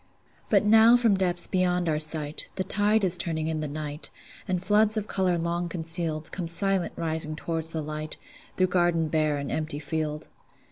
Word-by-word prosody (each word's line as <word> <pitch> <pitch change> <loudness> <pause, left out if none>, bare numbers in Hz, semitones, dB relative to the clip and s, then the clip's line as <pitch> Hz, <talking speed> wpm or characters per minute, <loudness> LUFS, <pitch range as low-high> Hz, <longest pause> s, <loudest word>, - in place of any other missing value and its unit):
But - - +3
now 225 +3 +7
from 230 -4 +3
depths 180 -2 +1
beyond 180 -2 0
our 155 -1 0
sight, 155 -1 +2
The 190 - -1
tide 205 +3 +1
is 185 -2 +2
turning 165 -3 +1
in 160 -1 -2
the 155 - -3
night, 150 +1 -4 0.4
And 185 -1 -2
floods 215 +1 +3
of 210 - -1
color 185 -4 0
long 170 +1 -2
concealed 165 -2 -1
Come 180 -3 -4
silent 195 +1 -1
rising 160 -1 0
toward 165 0 -3
the 160 -1 -3
light, 155 +1 -4 0.4
Through 185 - +4
garden 175 -3 +1
bare 155 -2 +1
and 140 -1 -5
empty 155 -1 -3
field. 150 0 -4
170 Hz, 180 wpm, -26 LUFS, 155-185 Hz, 0.4 s, now